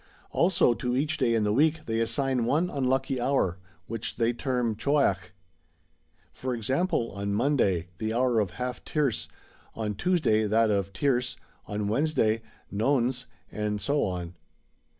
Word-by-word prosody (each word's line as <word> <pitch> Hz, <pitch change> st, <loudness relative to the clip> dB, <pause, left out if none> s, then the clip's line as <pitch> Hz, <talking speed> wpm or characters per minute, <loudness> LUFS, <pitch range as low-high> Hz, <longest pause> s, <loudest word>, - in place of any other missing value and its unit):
[Also 170 Hz, -8 st, +3 dB
to 125 Hz, +1 st, -2 dB
each 150 Hz, +4 st, +1 dB
day 115 Hz, -1 st, +3 dB
in 110 Hz, -, +2 dB
the 105 Hz, 0 st, +1 dB
week 155 Hz, +4 st, +2 dB
they 115 Hz, 0 st, -1 dB
assign 130 Hz, +1 st, 0 dB
one 165 Hz, +8 st, +1 dB
unlucky 130 Hz, -1 st, 0 dB
hour, 120 Hz, -9 st, +1 dB, 0.3 s
which 115 Hz, 0 st, -4 dB
they 115 Hz, +1 st, +1 dB
term 125 Hz, -3 st, -1 dB
Choiach. 110 Hz, -8 st, +1 dB, 1.0 s
For 130 Hz, -1 st, -3 dB
example, 130 Hz, -, 0 dB
on 100 Hz, +1 st, -2 dB
Monday 100 Hz, -, +1 dB
the 110 Hz, 0 st, -1 dB
hour 120 Hz, 0 st, +2 dB
of 105 Hz, -4 st, +1 dB
Half 125 Hz, 0 st, -4 dB
tierce, 145 Hz, -6 st, 0 dB, 0.5 s
on 110 Hz, -2 st, -2 dB
Tuesday 110 Hz, -, +2 dB
that 110 Hz, +1 st, +3 dB
of 100 Hz, -1 st, 0 dB
Tierce, 125 Hz, 0 st, 0 dB, 0.3 s
on 105 Hz, -1 st, -2 dB
Wednesday 115 Hz, -2 st, +1 dB, 0.3 s
Nones, 125 Hz, +3 st, +1 dB, 0.2 s
and 105 Hz, -1 st, -2 dB
so 140 Hz, +9 st, +1 dB
on. 90 Hz, -2 st, -3 dB
120 Hz, 145 wpm, -27 LUFS, 105-135 Hz, 1.0 s, Also